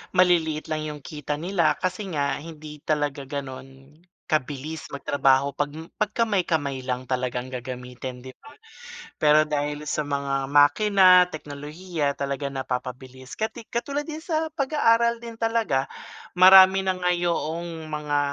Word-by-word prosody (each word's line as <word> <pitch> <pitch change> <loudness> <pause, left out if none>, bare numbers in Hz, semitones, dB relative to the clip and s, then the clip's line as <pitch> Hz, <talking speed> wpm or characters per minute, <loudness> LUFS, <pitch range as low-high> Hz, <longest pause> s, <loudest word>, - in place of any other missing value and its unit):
maliliit 170 -4 +3
lang 155 0 -1
'yong 150 -1 -7
kita 150 -2 -4
nila. 170 0 +1
Kasi 185 +3 -2
nga 145 -2 0
hindi 155 -1 -10
talaga 145 -2 -1
gano'n 135 +1 -8 0.3
kabilis 150 +1 -3
magtrabaho 140 0 +1
'pag 145 +1 -1
m 160 +3 -9 0.2
'pag 215 - +2
kamay-kamay 165 - 0
lang 130 0 -3
talagang 125 -1 -2
gagamitin 125 0 -7
'di 130 - -9
ba. - - -14 0.7
Pero 150 0 +5
dahil 150 -1 -2
sa 150 - -1
mga 140 -1 -1
makina, 180 +6 +6
teknolohiya 150 0 -4
talaga 140 0 -3
napapabilis. 130 -1 -6
Kati 220 +1 -4
katulad 280 +5 -3
din 315 0 -7
sa 320 -1 -1
pag-aaral 235 -5 +2
din 230 0 -9
talaga, 225 -12 0 0.5
marami 190 +1 +8
na 190 - +2
nga 180 -1 0
yoong 170 -2 -2
mga 150 -1 -1
150 Hz, 135 wpm, -25 LUFS, 140-185 Hz, 0.7 s, marami